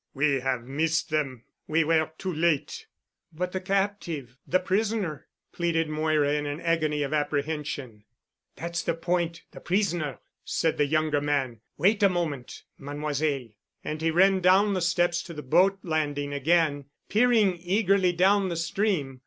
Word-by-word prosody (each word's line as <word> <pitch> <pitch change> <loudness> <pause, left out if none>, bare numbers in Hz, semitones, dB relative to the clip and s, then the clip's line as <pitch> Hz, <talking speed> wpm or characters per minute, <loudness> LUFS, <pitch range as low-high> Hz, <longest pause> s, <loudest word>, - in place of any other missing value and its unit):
"We 140 0 +2
have 130 -2 -1
missed 155 +5 -1
them. 135 -6 -1 0.2
We 160 +1 +2
were 160 0 +2
too 185 -2 -3
late——" 160 -2 0 0.4
"But 180 +3 -3
the 190 - -3
captive—the 185 - -1
prisoner," 195 -5 -1 0.3
pleaded 165 -2 0
Moira, 155 -1 +1
in 150 0 -1
an 145 +1 -4
agony 155 -3 0
of 140 - -3
apprehension. 145 -6 -3 0.5
"That's 170 0 -3
the 165 - -1
point—the 170 0 -3
prisoner," 175 - -1 0.3
said 160 - 0
the 145 - +3
younger 155 -1 +1
man. 135 -6 -1 0.2
"Wait 200 +7 +3
a 200 - +6
moment, 160 -8 -3 0.2
Mademoiselle." 145 -2 -2 0.3
And 155 +1 -4
he 165 - +2
ran 190 +3 +4
down 190 +3 +4
the 185 - -1
steps 175 0 +1
to 170 - -9
the 150 - -7
boat 190 +9 +3
landing 145 -4 -1
again, 145 0 +1 0.2
peering 215 -5 +3
eagerly 190 0 +2
down 190 +2 +3
the 170 - -3
stream. 165 -6 -1
160 Hz, 145 wpm, -27 LUFS, 145-180 Hz, 0.5 s, a